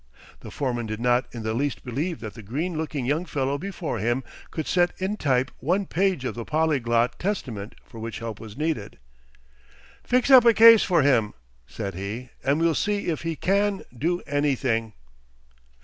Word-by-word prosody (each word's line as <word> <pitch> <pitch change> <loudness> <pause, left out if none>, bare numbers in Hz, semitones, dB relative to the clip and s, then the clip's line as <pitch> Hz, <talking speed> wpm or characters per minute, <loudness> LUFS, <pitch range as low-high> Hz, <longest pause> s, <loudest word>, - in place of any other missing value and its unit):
The - - -10
foreman 120 -4 -2
did 110 0 -4
not 125 +1 +2
in 115 -2 -7
the 110 0 -1
least 140 +4 -2
believe 150 +8 -3
that 110 -2 -6
the 115 - -10
green 150 - -3
looking 155 -4 -3
young 150 +6 0
fellow 140 -4 -2
before 180 - -4
him 120 +5 0 0.3
could 160 - -4
set 175 -1 +1
in 190 +3 -1
type 130 -8 +1
one 180 +9 0
page 185 -6 0
of - - -2
the 115 - -5
polyglot 125 -6 +1
Testament 120 - -3
for 115 - -12
which 115 0 -5
help 115 -2 -6
was 110 +1 -10
needed. 150 -9 -2 1.1
"Fix 250 +2 +2
up 255 -2 +10
a 235 -2 +5
case 230 -1 +9
for 175 -6 +3
him," 120 -7 +2 0.3
said 100 - -5
he, 105 +7 -6
"and 140 +3 +2
we'll 165 0 +3
see 205 +4 -1
if 160 - -2
he 165 -1 -3
can 200 +3 +1
do 170 +8 -1
anything." 130 -6 0
140 Hz, 180 wpm, -25 LUFS, 115-175 Hz, 1.1 s, up